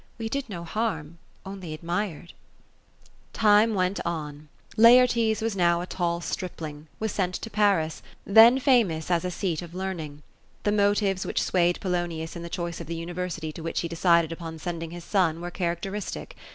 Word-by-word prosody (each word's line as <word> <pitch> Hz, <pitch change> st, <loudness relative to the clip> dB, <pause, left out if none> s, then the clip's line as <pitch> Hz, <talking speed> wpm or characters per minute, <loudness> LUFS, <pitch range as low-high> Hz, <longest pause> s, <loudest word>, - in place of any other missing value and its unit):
We 225 Hz, -1 st, -4 dB
did 275 Hz, 0 st, -3 dB
no 175 Hz, -4 st, -6 dB
harm; 170 Hz, -4 st, -3 dB, 0.3 s
only 190 Hz, -5 st, -6 dB
ad 155 Hz, -, -15 dB
mired." 175 Hz, -1 st, -3 dB, 1.0 s
Time 215 Hz, +1 st, +4 dB
went 185 Hz, +1 st, 0 dB
on. 150 Hz, -3 st, -5 dB, 0.3 s
Laertes 230 Hz, -2 st, +5 dB
now 170 Hz, -2 st, +3 dB
a -, -, -4 dB
tall 170 Hz, -2 st, -2 dB
stripling, 160 Hz, -4 st, -5 dB
was 220 Hz, -1 st, -1 dB
sent 180 Hz, -2 st, -1 dB
to 225 Hz, -, -6 dB
Paris, 200 Hz, -7 st, +1 dB
— -, -, -35 dB
then 235 Hz, +3 st, +9 dB
famous 220 Hz, -, +2 dB
as 170 Hz, 0 st, +2 dB
a 180 Hz, -, -1 dB
seat 180 Hz, -3 st, -2 dB
of 175 Hz, 0 st, -10 dB
learning. 165 Hz, -6 st, -5 dB, 0.4 s
The 205 Hz, -, +2 dB
motives 205 Hz, -2 st, +2 dB
which -, -, -1 dB
swayed 175 Hz, -1 st, +2 dB
Polonius 175 Hz, -3 st, -2 dB
in 170 Hz, -, -6 dB
the 170 Hz, -, -7 dB
choice 170 Hz, -1 st, -4 dB
of 165 Hz, -, -8 dB
the 165 Hz, 0 st, -4 dB
uniTersity 175 Hz, -3 st, -4 dB
to 165 Hz, -, -8 dB
which 165 Hz, +1 st, -2 dB
he 170 Hz, -, -2 dB
decided 170 Hz, -1 st, +3 dB
upon 165 Hz, -1 st, -6 dB
sending 165 Hz, 0 st, -5 dB
his 175 Hz, +1 st, -8 dB
son, 170 Hz, -4 st, +1 dB
were 175 Hz, +1 st, -5 dB
characteristic. 190 Hz, -, -4 dB
175 Hz, 175 wpm, -26 LUFS, 165-205 Hz, 1.0 s, then